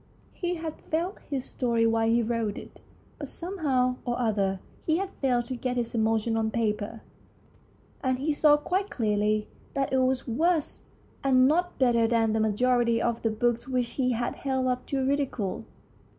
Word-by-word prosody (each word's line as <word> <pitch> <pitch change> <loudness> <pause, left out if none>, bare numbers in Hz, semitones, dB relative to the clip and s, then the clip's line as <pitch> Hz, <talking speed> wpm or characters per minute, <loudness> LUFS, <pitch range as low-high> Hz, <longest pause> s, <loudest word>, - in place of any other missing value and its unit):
He 355 -1 -2
had 320 -2 -6
felt 345 +5 -1
his 270 -3 -2
story 235 -3 0
while 225 0 +2
he 235 +1 +3
wrote 225 -2 -1
it, - - -11 0.4
but - - -4
somehow 275 -9 0
or 240 -1 -1
other 200 -5 +1 0.2
he 320 0 +2
had 385 +1 -3
failed 245 -3 +2
to 255 - -4
get 250 +1 -2
his 235 -1 -2
emotions 225 0 +1
on 220 -1 +1
paper, 220 -1 -2 1.0
and 260 -1 +1
he 295 +4 0
saw 295 0 +5
quite 375 +7 -1
clearly 210 -1 0 0.3
that 275 -1 0
it 265 - +4
was 255 0 +1
worse 315 +6 +1 0.4
and 260 -1 +5
not 350 +4 +1
better 235 -3 +3
than 225 -1 +2
the 220 - +1
majority 235 +2 +2
of 235 -1 -1
the 225 - +1
books 235 +2 0
which 250 -2 0
he 255 0 0
had 240 +1 -2
held 265 -2 -1
up 250 0 -1
to 270 -2 0
ridicule. 265 -8 -1
250 Hz, 175 wpm, -27 LUFS, 225-275 Hz, 1.0 s, saw